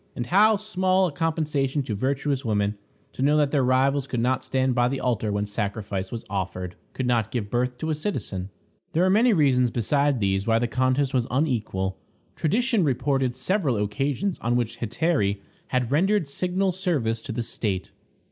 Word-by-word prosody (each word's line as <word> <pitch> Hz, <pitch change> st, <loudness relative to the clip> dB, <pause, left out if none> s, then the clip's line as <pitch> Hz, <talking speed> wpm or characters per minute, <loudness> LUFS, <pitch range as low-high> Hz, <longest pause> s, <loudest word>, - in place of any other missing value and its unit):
And 120 Hz, -, -3 dB
how 210 Hz, -, +5 dB
small 190 Hz, -2 st, +1 dB
a 175 Hz, -, -1 dB
compensation 150 Hz, -3 st, 0 dB
to 115 Hz, -, -4 dB
virtuous 135 Hz, +4 st, -1 dB
women 105 Hz, -3 st, 0 dB, 0.4 s
to -, -, -6 dB
know 145 Hz, +3 st, +4 dB
that 145 Hz, -2 st, +2 dB
their 140 Hz, -3 st, +2 dB
rivals 135 Hz, +2 st, +2 dB
could 125 Hz, -, -2 dB
not 125 Hz, +2 st, +1 dB
stand 130 Hz, -1 st, 0 dB
by 120 Hz, 0 st, +3 dB
the 135 Hz, +2 st, -2 dB
altar 115 Hz, -4 st, 0 dB
when 105 Hz, 0 st, -1 dB
sacrifice 100 Hz, -2 st, -3 dB
was 115 Hz, -, -6 dB
offered; 90 Hz, -2 st, -4 dB, 0.2 s
could 130 Hz, -, -2 dB
not 115 Hz, -3 st, +1 dB
give 110 Hz, -4 st, -3 dB
birth 125 Hz, +1 st, 0 dB
to 160 Hz, +5 st, -2 dB
a -, -, +2 dB
citizen! 125 Hz, -, -3 dB, 0.4 s
There 170 Hz, +3 st, +3 dB
are 185 Hz, -, +3 dB
many 230 Hz, +5 st, +5 dB
reasons 135 Hz, -, +3 dB
besides 140 Hz, +4 st, +1 dB
these 95 Hz, 0 st, 0 dB
why 115 Hz, 0 st, +4 dB
the 120 Hz, +1 st, +1 dB
contest 130 Hz, +3 st, +1 dB
was 125 Hz, -2 st, +1 dB
unequal. 110 Hz, -9 st, -1 dB, 0.4 s
Tradition 225 Hz, -, +1 dB
reported 135 Hz, -2 st, 0 dB
several 145 Hz, -, 0 dB
occasions 140 Hz, -, -1 dB
on 120 Hz, +1 st, 0 dB
which 120 Hz, -2 st, -1 dB
hetairæ 115 Hz, -, 0 dB, 0.3 s
had 125 Hz, -1 st, -1 dB
rendered 185 Hz, +3 st, +2 dB
signal 185 Hz, +6 st, 0 dB
service 150 Hz, -, -1 dB
to 120 Hz, -, -6 dB
the 115 Hz, +1 st, -2 dB
state. 105 Hz, -5 st, -2 dB
130 Hz, 180 wpm, -25 LUFS, 115-155 Hz, 0.4 s, how